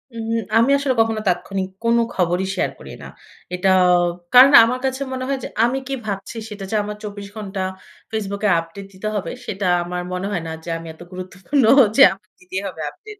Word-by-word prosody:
উহু, 225 0 -3 0.2
আমি 230 +4 +4
আসলে 280 -2 0
কখনো 225 -1 0
তাৎক্ষণিক 190 +1 -2
কোন 230 0 +3 0.2
খবরই 180 +1 0
শেয়ার - - 0
করি - - -11
না। - - -8 0.5
এটা 180 +2 +1 0.6
কারণ 260 +3 +9
আমার 250 +3 0
কাছে 265 +1 -2
মনে 255 0 -4
হয় 275 -1 -1
যে - - -3 0.2
আমি 250 +3 0
কি 275 - -3
ভাবছি 200 +2 -5
সেটা 200 -2 -7
যে - - 0
আমার 210 0 -5
২৪ 205 -1 -7
ঘন্টা 200 -3 -5 0.5
Facebook 200 -2 -3
এ - - +3
আপডেট 165 +4 -9
দিতে 200 +3 -6
হবে 180 -5 -3
সেটা 195 -1 -4 0.2
আমার 180 +1 -4
মনে 180 +2 -3
হয় 180 - -2
না, 160 - -5
যে 170 - -8
আমি 165 0 -10
এত 160 - -19
গুরুত্বপূর্ণ 185 +9 -2 0.3
যে 280 - +6
আমাকে 190 0 -21
দিতেই 185 +1 -5
হবে 165 -4 -8
আপডেট। 425 - -13
200 Hz, 200 wpm, -20 LUFS, 185-230 Hz, 0.6 s, কারণ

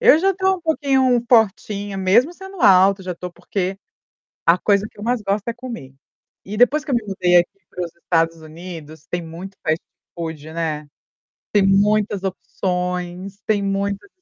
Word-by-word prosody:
eu 460 -9 +7
já 385 +3 +2
tô 380 +1 +2
um 355 - -12
pouquinho 265 -6 +2
fortinha, 205 -3 +2
mesmo 215 - +3
sendo 385 -1 -10
alta. 195 -2 +6
Já 180 -1 -4
tô 180 +1 -7
porque 185 +2 -3 0.7
a 165 +2 +6
coisa 200 +2 +2
que - - -20
eu 205 - -6
mais 240 -1 0
gosto 200 +1 -1
é 235 - 0
comer. 235 - -8 0.5
E 205 +2 -6
depois 255 +6 +4
que 285 - -3
eu - - +3
me 235 - 0
mudei 180 -2 +3
aqui 195 +3 +1
para 180 - -4
os 170 - -12
Estados 165 -1 +1
Unidos, 160 -1 -10
tem 175 - -2
muito 175 +4 -9
fast 160 +1 +1 0.3
food, 160 -2 -6
né. 155 -3 -3 0.7
Tem 205 - +4
muitas 205 0 +3
opções, 180 0 -3
tem 210 -2 +2
muitas 200 +1 -2
195 Hz, 175 wpm, -21 LUFS, 175-225 Hz, 0.7 s, eu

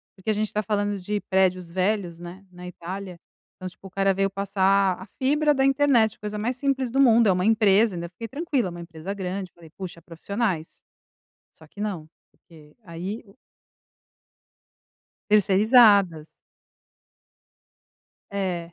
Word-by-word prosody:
Porque 190 +3 -7
a - - +3
gente 215 +1 -1
está 210 - -2
falando 205 -1 -1
de 205 +3 -3
prédios 185 -2 +1
velhos, 185 -2 -1
né, 180 +3 -10
na 180 0 -10
Itália. 180 +1 -7 0.4
Então 185 0 -7
tipo 195 - -14
o - - -12
cara 195 0 +1
veio 195 +1 0
passar 195 -1 +1
a - - -8
fibra 295 +3 +2
da 270 -1 +1
internet, 270 -5 +3
coisa 210 0 -5
mais 240 +4 -2
simples 265 -3 -1
do 270 - 0
mundo, 235 -4 +5
é - - +5
uma 180 +1 0
empresa, 215 -2 +3
ainda 170 0 -5
fiquei 230 +6 -8
tranquila, 280 - -1
é - - -6
uma 175 0 -8
empresa 170 +2 -7
grande, 190 -1 -5
falei: 165 -2 -16
"Puxa. 180 -3 -8
Profissionais.". 175 0 -4 0.7
Só 160 - -18
que 180 - -22
não, 190 -7 -4 0.2
porque 155 -3 -19
aí 180 +6 -6
o 195 +4 -20 1.9
Terceirizadas. 200 -5 +5 2.0
É. 180 -4 -3
195 Hz, 150 wpm, -24 LUFS, 180-215 Hz, 2.0 s, mundo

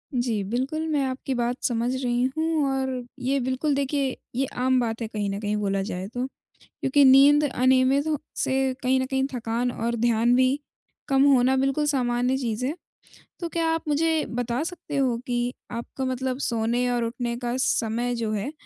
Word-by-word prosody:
जी, 235 -5 0
बिल्कुल, 275 +7 -1
मैं 295 -3 +1
आपकी 265 +1 -3
बात 240 +1 0
समझ 240 0 0
रही 245 0 +1
हूँ 320 -2 +1
और 265 -2 -2 0.2
ये 270 +2 0
बिल्कुल, 260 +4 0
देखिए, 275 -1 0 0.2
ये 270 +1 +1
आम 255 0 +2
बात 230 -1 -2
है 225 - -2
कहीं 210 -2 -3
न 200 +1 -3
कहीं, 210 0 -1
बोला 195 -1 0
जाए 190 -1 -4
तो। 245 +1 -2 0.4
क्योंकि 280 +2 +1
नींद 280 +3 +7
अनियमित 260 +2 +3
हो 305 -2 +1 0.2
से 265 0 +1
कहीं 260 +1 +3
न 260 - 0
कहीं 265 0 0
थकान 240 +1 -1
और 235 +1 -2
ध्यान 235 +1 +3
भी 260 +2 +3 0.5
कम 270 0 +3
होना 260 +1 +4
बिल्कुल 275 +3 +1
सामान्य 250 -1 +1
चीज़ 240 -1 -2
है। 290 - -2 0.6
तो 340 -2 -3
क्या 330 -1 0
आप 325 - -2
मुझे 315 +1 +1
बता 245 +1 -2
सकते 330 -4 -5
हो 255 -4 +2
कि 245 0 -1 0.2
आपका 235 +3 -5
मतलब 260 0 -2
सोने 235 +1 0
और 240 -1 0
उठने 235 0 -3
का 240 0 -3
समय 240 -1 0
जो 225 -2 -2
है, 215 +7 -2
255 Hz, 185 wpm, -25 LUFS, 235-270 Hz, 0.6 s, नींद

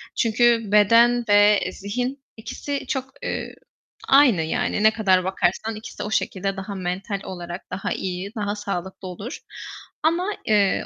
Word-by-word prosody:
Çünkü 230 -2 +2
beden 230 +3 +5
ve 205 0 +6
zihin 250 +8 -4
ikisi 260 +5 -5
çok, 265 -2 -3
eee, - - -4 0.5
aynı 270 - +6
yani 160 +6 -1
ne 220 - +7
kadar 190 -4 +3
bakarsan 190 +4 -1
ikisi 215 +3 -8
o 210 - -5
şekilde 195 -2 -1
daha 195 +1 -5
mental 190 +3 -3
olarak 175 -1 -8
daha 185 +2 -3
iyi, 185 +1 -4
daha 205 -1 -2
sağlıklı 190 -2 -5
olur 200 +7 -7 0.6
ama, 350 +6 +1
eee, 205 -3 +2
205 Hz, 140 wpm, -23 LUFS, 190-235 Hz, 0.6 s, ne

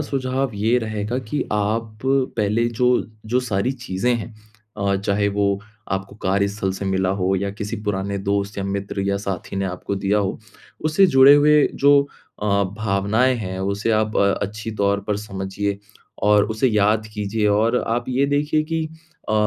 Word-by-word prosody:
सुझाव 135 -2 -1
ये 110 +4 +2
रहेगा 110 +1 -3
कि 130 +4 -3
आप 110 +1 -1
पहले 115 -5 +1
जो, 125 +1 +1 0.2
जो 125 +3 +1
सारी 120 +1 -1
चीज़ें 120 -1 -1
हैं 115 -1 -5 0.4
अ, 100 -1 0
चाहे 100 +1 0
वो 100 0 0 0.3
आपको 95 +1 -3
कार्यस्थल 100 0 0
से 100 - -5
मिला 95 -1 0
हो 95 0 +1
या 100 +1 -2
किसी 105 +2 -5
पुराने 100 -1 -2
दोस्त 100 0 -1
या - - -1
मित्र 100 0 -3
या 100 - +1
साथी 95 0 -4
ने 95 - 0
आपको 90 +2 -4
दिया 100 +2 +1
हो। 95 -2 -1 0.5
उससे 155 +5 +4
जुड़े 135 -2 +7
हुए 150 0 +5
जो 140 0 +5 0.4
अ, 105 - 0 0.3
भावनाएँ 110 +4 +1
हैं 95 -4 -5
उसे 100 +3 -1
आप 110 0 +1
अ, 100 0 +4
अच्छी 110 +2 -4
तौर 100 0 +2
पर 105 - 0
समझिए 100 0 -4 0.4
और 105 0 +5
उसे 110 +4 +1
याद 105 0 +2
कीजिए 105 0 -1
और 110 +4 +2
आप 120 +1 0
ये 130 +2 +2
देखिए 150 +2 +1
कि 160 0 -2 0.4
अ, 110 - 0
105 Hz, 170 wpm, -21 LUFS, 100-120 Hz, 0.5 s, जुड़े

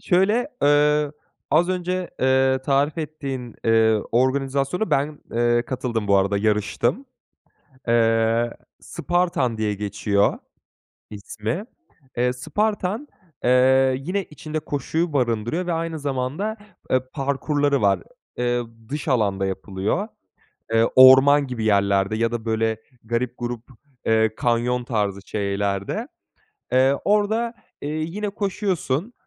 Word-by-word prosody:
Şöyle, 205 +8 +2
eee, 150 0 +3 0.4
az 165 +5 +3
önce, 185 0 -2
eee, 130 0 +3
tarif 140 +3 +1
ettiğin, 135 -6 -5
eee, 110 -1 +4
organizasyona 135 - 0
ben, 145 +2 0
eee, 120 0 +2
katıldım 120 -4 -3
bu 100 - +5
arada 100 +1 +2
yarıştım. 105 - 0 0.8
Eee, 115 0 +2 0.3
Spartan 175 -10 -1
diye 110 -1 0
geçiyor 100 0 0 0.7
ismi, 110 - -5 0.5
eee, 125 +1 +2
Spartan, 205 - -2 0.4
eee, 130 +1 +4
yine 180 +8 -2
içinde 155 0 -6
koşuyu 155 +3 -2
barındırıyor 120 +6 0
ve 175 - -1
aynı 165 -1 -2
zamanda, 145 +9 -2 0.3
eee, 130 - +3
parkurları 140 0 0
var. 100 -2 +3 0.4
Eee, 120 0 0 0.3
dış 145 +3 -4
alanda 100 -7 +1
yapılıyor. 95 - -2 0.6
Eee, 115 0 +4
orman 135 +2 +8
gibi 125 -4 -4
yerlerde 100 -1 +2
ya 115 +1 0
da, 120 -2 -3
böyle, 110 -1 0 0.2
garip 120 +2 -2
gurup, 120 -1 -4 0.4
eee, 110 -1 +3
kanyon 120 +1 0
tarzı 105 -5 -1
şeylerde. 100 - -2 0.6
Eee, 130 +2 +4
orada, 220 +3 +1 0.3
eee, 145 - -4
yine 165 +7 -3
koşuyorsun, 195 - -2
130 Hz, 115 wpm, -23 LUFS, 115-155 Hz, 0.8 s, orman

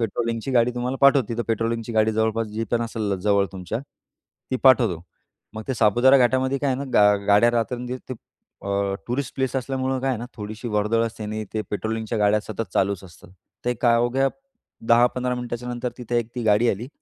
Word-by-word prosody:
पेट्रोलिंगची 115 +2 -2
गाडी 125 -1 +3
तुम्हाला 125 +2 -2
पाठवतो. 140 -3 +5
तिथं 115 0 -2
पेट्रोलिंगची 115 +1 -1
गाडी 110 0 +2
जवळपास 110 +1 0
जी 110 +2 -3
पण 120 0 +2
असेल 110 -3 -2
जवळ 100 -1 +2
तुमच्या, 95 +3 -4 0.7
ती 130 - +1
पाठवतो. 120 -10 +5 0.5
मग 110 - -5
ते 130 - 0
सापुतारा 120 +5 +5
घाटामध्ये 130 +2 +2
काय 140 - -1
आहे 130 - -1
ना, 140 - -3
गा 105 0 +6
गाड्या 105 +3 +5
रात्रंदिवस 125 +2 -2
ते - - -2 0.5
अ, 100 0 -1
टुरिस्ट 130 +2 -3
प्लेस 130 0 -1
असल्यामुळं 130 0 -2
काय 135 - -1
आहे 120 - -2
ना, 120 - -6
थोडीशी 110 +3 -6
वर्दळ 105 +2 +1
असते 110 -1 -7
आणि 110 +1 -4
ते 110 - 0
पेट्रोलिंगच्या 110 +1 -3
गाड्या 105 +1 +3
सतत 110 +1 -6
चालूच 100 -1 0
असतात. 85 -1 -16 0.3
ते 125 0 0
काय 120 0 +3
अवघ्या 125 +3 +2 0.6
10-15 125 +1 +3
मिनिटाच्यानंतर 125 0 -4
तिथे 120 0 -1
एक 115 - -3
ती 120 - -2
गाडी 110 +3 +4
आली. 115 +6 -5
115 Hz, 185 wpm, -23 LUFS, 105-125 Hz, 0.7 s, गा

